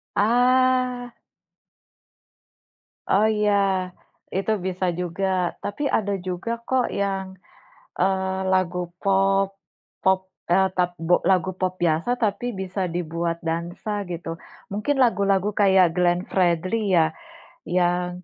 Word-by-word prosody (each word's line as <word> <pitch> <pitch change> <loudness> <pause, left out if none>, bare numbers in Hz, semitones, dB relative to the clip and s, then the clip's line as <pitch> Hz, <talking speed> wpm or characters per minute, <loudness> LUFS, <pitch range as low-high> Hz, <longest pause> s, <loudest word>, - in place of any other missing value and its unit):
Ah. 250 +2 +2 2.0
Oh, 200 +3 +4
iya, 210 -1 +2 0.8
itu 195 +3 0
bisa 185 0 -2 0.2
juga 180 +2 -3 0.4
tapi 205 +8 -4
ada 205 -2 -1
juga 185 +5 -3 0.2
kok 260 -2 +2
yang, 195 -1 -1 0.7
eee, 190 0 +1
lagu 180 -1 +1 0.2
pop 195 0 +2 0.5
pop, 190 0 +3 0.3
eee, 190 +2 +4
tap 180 -1 +2 0.2
bo 180 - +5 0.2
lagu 185 0 +2
pop 185 -1 +1
biasa 165 +6 +1
tapi 210 +2 0 0.2
bisa 190 +1 -4
dibuat 170 0 -2
dansa 170 +5 -3 0.2
gitu. 170 -1 -5 0.4
Mungkin 215 +8 -1
lagu-lagu 200 -3 +2
kayak 190 -4 +5
Glenn 175 0 +2
Fredly 185 +3 +1
ya 160 -1 +3 0.6
yang, 180 0 0
190 Hz, 110 wpm, -23 LUFS, 180-205 Hz, 2.0 s, bo